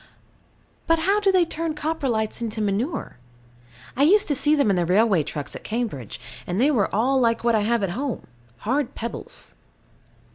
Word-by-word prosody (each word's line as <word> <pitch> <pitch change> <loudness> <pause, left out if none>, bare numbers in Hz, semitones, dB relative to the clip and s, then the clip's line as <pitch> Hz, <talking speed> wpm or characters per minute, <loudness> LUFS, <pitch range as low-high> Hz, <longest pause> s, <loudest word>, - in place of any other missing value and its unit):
But 330 0 +4
how 390 +6 +2
do 405 -2 +3
they 370 -2 +4
turn 325 -1 -3
Coprolites 270 -9 -2
into 225 -1 -3
manure? 210 - -2 0.8
I 265 - -1
used 395 +8 +5
to - - +3
see 295 +3 +4
them 280 -8 +3
in - - +2
the 175 - +1
railway 190 +1 +3
trucks 145 -1 -5
at - - -8
Cambridge, 215 - -4 0.3
and 180 +3 -1
they 280 +5 +4
were 220 -9 +2
all 255 +6 +2
like 230 -2 +1
what 235 0 +3
I 220 - +3
have 225 +1 +1
at 190 - 0
home 260 +6 -3 0.4
hard 265 +3 0
pebbles. 235 - -6
235 Hz, 180 wpm, -24 LUFS, 210-300 Hz, 0.8 s, used